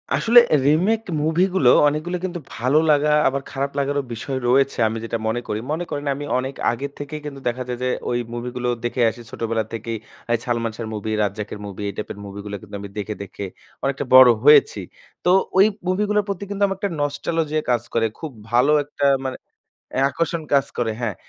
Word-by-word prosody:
আসলে 235 +2 +7 0.3
remake 185 +10 +3 0.2
movie 160 +3 +2
গুলো 135 -10 +5 0.2
অনেক 150 +1 0
গুলো 180 +1 -1
কিন্তু 175 -1 -4 0.2
ভালো 130 +6 +2
লাগা 150 0 +4 0.2
আবার 140 +1 0
খারাপ 140 0 -2
লাগার 140 +1 0 0.2
বিষয় 130 +4 -4
রয়েছে। 135 +2 +3
আমি 110 +1 -3
যেটা 115 - -2
মনে 115 +2 -1
করি। 105 - -2
মনে 160 +3 -1
করেন 145 0 -4
আমি 145 +1 -5
অনেক 130 +1 -3 0.2
আগে 135 +4 -3
থেকেই 150 +1 -6
কিন্তু 140 -2 -6
দেখা 125 +1 -1
যায় 125 -1 -3
যে 125 - +1 0.2
ওই 120 - 0
মুভি 120 +1 -4
গুলো 125 0 -1
দেখে 120 +1 -1
আসি 120 - -9
ছোটবেলা 115 -1 -1
থেকেই। 115 0 -4 0.4
এই - - +3
সালমান 115 -2 -1
শাহ্‌র 115 -1 -5
মুভি, 105 +1 -4
রাজ্জাকের 105 +1 -4
মুভি 100 0 -8
এই - - -6
টাইপের 105 - -5
মুভি 100 0 -8
গুলা 105 0 -5
কিন্তু 105 -1 -10
আমি 100 - -7
দেখে, 105 +1 -3
দেখে 100 +1 -7 0.4
অনেকটা 135 0 -1
বড় 130 -1 +10
হয়েছি। 150 - +6 0.5
তো - - +4 0.3
ওই 195 - +8 0.2
মুভি 185 +3 +1
গুলার 210 0 +2
প্রতি 200 -1 -3
কিন্তু 200 0 -1
আমার 195 -1 -3
একটা 200 - -1
নস্টালজিয়া 155 +2 -1
কাজ 120 -2 +2
করে। 115 -1 +2
খুব 160 -2 -6 0.2
ভালো 125 +5 +4
একটা 145 0 -3 0.2
মানে 130 - -3 0.6
অ্যা 135 +1 +3
আকর্ষণ 165 +3 -1
কাজ 140 -1 +4
করে 120 -2 0
হ্যাঁ। 110 -5 -2
135 Hz, 205 wpm, -22 LUFS, 115-150 Hz, 0.6 s, বড়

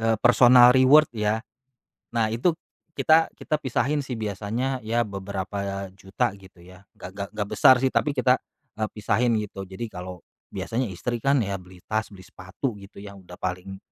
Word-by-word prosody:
eee, 115 0 +2
"personal 125 +1 +7
reward" 130 +3 +5
ya. 110 +1 -1 0.7
Nah, 110 -1 +1
itu 160 +9 +1 0.4
kita 160 +1 +4
kita 155 -1 -2
pisahin 140 +3 0
sih 130 -4 -5
biasanya 110 +5 -3
ya 115 +2 0
beberapa 100 -1 -5
juta 95 +1 -2
gitu 95 -2 -18
ya, 90 +2 -16
nggak 90 - -9
nggak 100 -1 -4
nggak 105 -1 -2
besar 130 - +6
sih 130 - +1
tapi 145 -2 0
kita, 125 0 +3 0.4
eee, 110 - 0
pisahin 110 +3 +1
gitu. 100 -3 -5
Jadi 95 +5 -6
kalau 90 -1 -8 0.3
biasanya 115 -2 -3
istri 115 +6 -4
kan 140 0 +3
ya 100 -4 -1
beli 90 0 -16
tas, 110 -1 -2
beli 95 -2 -14
sepatu 95 +6 -5
gitu 100 0 -14
ya 100 0 -10
udah 90 -2 -13
paling 90 +1 -5
105 Hz, 175 wpm, -25 LUFS, 95-125 Hz, 0.7 s, personal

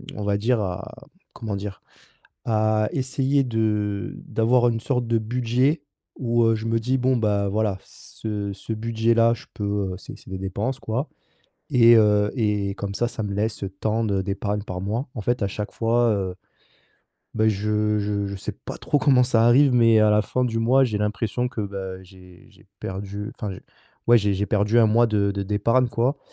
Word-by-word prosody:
on 105 - -5
va 100 0 +1
dire 115 +3 +1
à, 90 -3 -5 0.4
comment 110 -3 -5
dire? 100 -1 -6 0.6
À 110 -1 +1
essayer 135 +1 0
de 105 -4 -1
d'avoir 120 +2 +2
une 115 -1 -1
sorte 125 -2 -1
de 115 0 +2
budget 125 +6 0 0.4
où, 120 -2 +1
heu, 115 0 +3
je 110 +1 -5
me 115 0 +1
dis: 125 +4 0
«Bon 130 0 +2
bah 105 -2 +1
voilà 105 -1 0
ce 105 -2 -6
ce 110 +3 -6
budget 115 +1 0
là, 115 0 +4
je 120 +4 -9
peux, 100 -2 -2
heu, - - -5
c'est - - -11
c'est - - -16
des 95 - -4
dépenses 100 +7 -3
quoi 125 +6 -2 0.7
et 120 -1 +7
heu, 105 -1 +4
et 105 -4 0
comme 100 -1 -5
ça, 120 +4 0
ça 115 -2 -5
me 100 -1 -3
laisse, 105 +2 -2
heu, 95 - -3
tant 110 +4 -2
de 100 -3 0
d'épargne 100 +2 -2
par 90 -3 -6
mois». 110 +8 -2
En 110 - -4
fait 120 +3 -1
à - - +1
chaque 105 +2 -5
fois, 120 +1 +2
heu, 95 -3 -2 1.0
bah, 110 0 +3
je 105 +1 0
je 100 -1 -1
je 100 - -5
sais 95 - -5
pas - - -9
trop 145 - 0
comment 135 -2 +4
ça 115 -2 +3
arrive, 135 +3 +5
mais 115 -2 +5
à 110 0 +5
la 105 0 +4
fin 125 +4 -1
du 115 -2 -1
mois, 130 +4 +4
j'ai 110 -5 -1
l'impression 110 +3 -1
que 120 - -5
bah 95 -2 -6
j'ai 90 -1 -17
j'ai - - -22
perdu, 100 +2 -5
enfin 105 - -5
j'ai 95 - -10 0.4
ouais 120 0 +7
j'ai 100 -1 0
perdu 105 +3 +2
un 115 - +6
mois 115 +2 +4
de 105 -2 +1
de 100 0 -3
d'épargne, 110 +6 +1
quoi, 120 +5 0
110 Hz, 200 wpm, -23 LUFS, 100-120 Hz, 1.0 s, et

